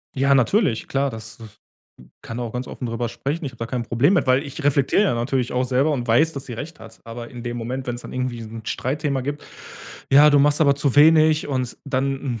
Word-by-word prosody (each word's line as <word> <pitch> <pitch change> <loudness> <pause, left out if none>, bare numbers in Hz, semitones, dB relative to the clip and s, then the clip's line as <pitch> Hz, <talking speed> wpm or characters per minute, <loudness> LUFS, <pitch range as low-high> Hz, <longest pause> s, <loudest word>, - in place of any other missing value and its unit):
Ja, 140 +1 +3
natürlich, 135 - +2
klar, 140 0 0
das 110 -1 -9
das 110 -2 -13 0.7
kann 115 +2 -6
auch 115 -2 -4
ganz 125 +1 -4
offen 125 - -6
drüber 115 0 -3
sprechen, 150 +4 -4
ich 135 - -3
habe 120 - -19
da 115 - -4
kein 125 -1 -3
Problem 120 - +2
mit, 160 - +1
weil 130 +2 +3
ich 145 +1 -8
reflektiere 145 +7 +3
ja 190 - +1
natürlich 125 +1 -1
auch 125 +1 0
selber 130 +4 +1
und 125 -4 -2
weiß, 155 +8 +3
dass 140 -1 -7
sie 120 - -6
recht 150 +6 -8
hat, 115 0 -13
aber 115 +1 -8
in 120 -1 -10
dem 120 0 -4
Moment, 125 +3 -5
wenn's 120 0 -4
dann - - -10
irgendwie 125 -2 -3
so 110 - -9
'n 110 0 -9
Streitthema 140 +2 -2
gibt: 145 +3 -5 0.7
„Ja, 150 +2 +7
du 145 - +5
machst 145 +2 +3
aber 140 -1 +4
zu 140 -1 -1
wenig“ 155 +1 +5
und 130 -3 -3
dann, 135 -3 -2
130 Hz, 235 wpm, -22 LUFS, 120-145 Hz, 0.7 s, Ja